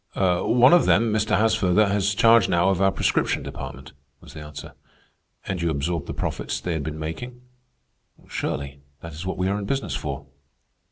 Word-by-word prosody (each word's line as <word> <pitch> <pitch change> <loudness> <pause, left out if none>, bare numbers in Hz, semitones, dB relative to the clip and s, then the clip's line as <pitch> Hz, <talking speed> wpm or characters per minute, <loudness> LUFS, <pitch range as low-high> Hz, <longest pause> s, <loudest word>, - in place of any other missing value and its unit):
"One 100 - +4
of 175 - +5
them, 110 +1 +3
Mr. 110 0 +1
Haasfurther, 110 -2 +3
has 100 0 0
charge 115 +1 +5
now 85 +2 +3
of 95 -1 0
our 95 0 +4
prescription - - 0
department," 65 -1 -8 0.3
was - - -14
the - - -9
answer. 75 0 -9 0.7
"And 90 -3 -3
you 85 - +1
absorbed 80 +1 -2
the - - -4
profits 60 - -3
they 85 +6 -3
had 80 - -2
been 75 +1 -5
making?" 120 +11 -6 0.9
"Surely. 70 0 -4 0.2
That 85 -1 -9
is 80 +5 -7
what 95 - -3
we 90 - 0
are 100 +2 0
in 100 - -5
business 135 +6 -2
for." 70 -1 -5
90 Hz, 180 wpm, -24 LUFS, 80-105 Hz, 0.9 s, of